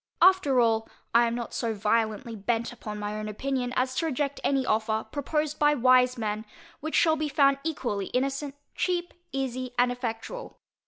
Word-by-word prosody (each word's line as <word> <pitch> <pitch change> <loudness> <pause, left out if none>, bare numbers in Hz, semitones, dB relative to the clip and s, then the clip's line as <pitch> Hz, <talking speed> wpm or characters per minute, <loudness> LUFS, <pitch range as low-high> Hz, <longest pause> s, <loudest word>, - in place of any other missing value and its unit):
After 355 -8 +5
all, 225 -2 +2 0.2
I 235 0 +6
am 230 - -1
not 240 -1 -5
so 230 -2 -1
violently 220 +3 0
bent 230 +3 -1
upon 210 -3 -7
my 210 0 -3
own 215 0 -4
opinion, 250 +3 -2
as 255 0 +1
to 330 - +1
reject 285 -1 -1
any 270 -2 +2
offer, 220 -1 0
proposed 300 +1 -1
by 295 0 +4
wise 255 0 +4
men, 215 -1 -2 0.4
which 315 +2 -3
shall 320 -1 +5
be 305 -1 -2
found 275 -1 +4
equally 245 -11 -2
innocent, 275 +2 -1 0.2
cheap, 350 -1 -1 0.2
easy, 255 -2 -3
and 245 0 +4
effectual. 245 - -5
250 Hz, 170 wpm, -27 LUFS, 225-280 Hz, 0.4 s, I